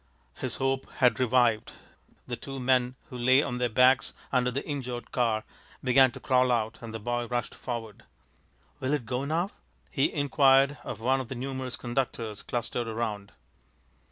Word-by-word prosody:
His - - -3
hope 135 0 -1
had 125 -3 +3
revived. 120 -3 +2 0.5
The 120 - -4
two 135 +3 -7
men 125 0 +2 0.2
who 125 - -6
lay 130 +4 +5
on 125 -4 -3
their 125 -1 +1
backs 125 +3 +4 0.2
under 125 -1 +2
the 130 +3 -3
injured 125 -5 -4
car 115 -3 +1 0.4
began 130 0 +6
to 135 - -8
crawl 130 -1 +3
out, 115 -1 0
and 115 -1 -7
the 115 - -4
boy 120 +2 -2
rushed 120 -1 -2
forward. 115 -4 -6 0.8
"Will 135 +3 +1
it 135 -6 -4
go 125 +4 -2
now?" 170 +7 0 0.4
he 135 - +2
inquired 140 -1 +4
of - - -6
one 130 +3 +2
of 130 - -7
the 130 - -5
numerous 130 0 -4
conductors 120 -4 -3
clustered 120 0 -3
around. 105 -3 -3
125 Hz, 165 wpm, -28 LUFS, 120-135 Hz, 0.8 s, began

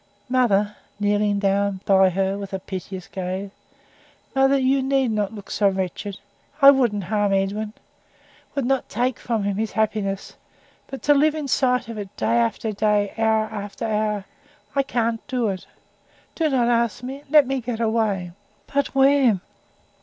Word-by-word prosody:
Mother," 210 -5 +2 0.2
kneeling 205 0 +1
down 200 -1 0
by 190 -1 +5
her 190 +1 0
with 200 -1 -7
a 190 - -2
piteous 185 0 -7
gaze 190 +1 -4 0.8
"mother, 270 +1 +4
you 265 +1 +2
need 265 -2 +1
not 210 -2 -1
look 200 -2 -10
so 200 -1 +3
wretched. 190 +1 -4 0.4
I 280 -1 +10
wouldn't 235 -7 +1
harm 205 +2 0
Edwin 205 +2 -1 0.8
would 275 -3 0
not 270 +1 0
take 250 +1 -1
from 225 -3 -1
him 200 -1 -1
his 220 0 -2
happiness; 205 -3 -1 0.5
but 270 - -8
to 290 - +5
live 300 +2 +3
in 300 -2 -4
sight 250 -2 +1
of 230 -2 -6
it 200 -1 -8
day 115 +2 +2
after 120 - 0
day, 205 -1 +1
hour 220 -1 +3
after 205 -2 -6
hour 210 -2 -1 0.5
I 275 - +4
can't 235 -4 -1
do 250 -5 0
it! 190 -2 -5 0.7
Do 320 -2 0
not 250 -4 +2
ask 235 0 +1
me 265 +2 -6
let 300 -1 +6
me 270 0 -2
get 235 -1 -4
away." 220 -6 0 0.3
"But 280 -1 -1
where?" 270 -6 +4
215 Hz, 160 wpm, -23 LUFS, 200-255 Hz, 0.8 s, I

